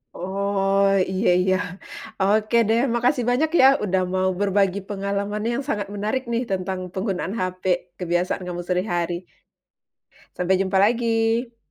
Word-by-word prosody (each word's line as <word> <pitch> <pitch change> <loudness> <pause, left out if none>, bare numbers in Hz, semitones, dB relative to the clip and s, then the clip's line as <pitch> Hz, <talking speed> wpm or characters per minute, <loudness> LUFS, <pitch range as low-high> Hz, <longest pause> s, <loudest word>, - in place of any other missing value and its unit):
Oh, 195 +1 0 0.3
iya 190 +4 +1
iya, 185 +1 +2 0.7
oke, 215 +3 +2
deh, 225 +1 +3 0.2
makasih 245 +1 +1
banyak 290 +6 +2
ya - - +7 0.2
udah 190 -2 +1
mau 185 0 +1
berbagi 200 -1 +2
pengalaman 200 +1 -2
yang 240 +4 -1
sangat 205 -4 -1
menarik 215 +6 -2
nih, 235 +1 0
tentang 190 0 -2
penggunaan 190 0 -2
HP 185 0 -3 0.4
kebiasaan 175 +1 -1
kamu 175 0 -4
sehari-hari. 175 -1 -2 1.1
Sampai 185 +1 +1
jumpa 190 0 +1
lagi! 230 +1 +1
200 Hz, 130 wpm, -23 LUFS, 185-225 Hz, 1.1 s, ya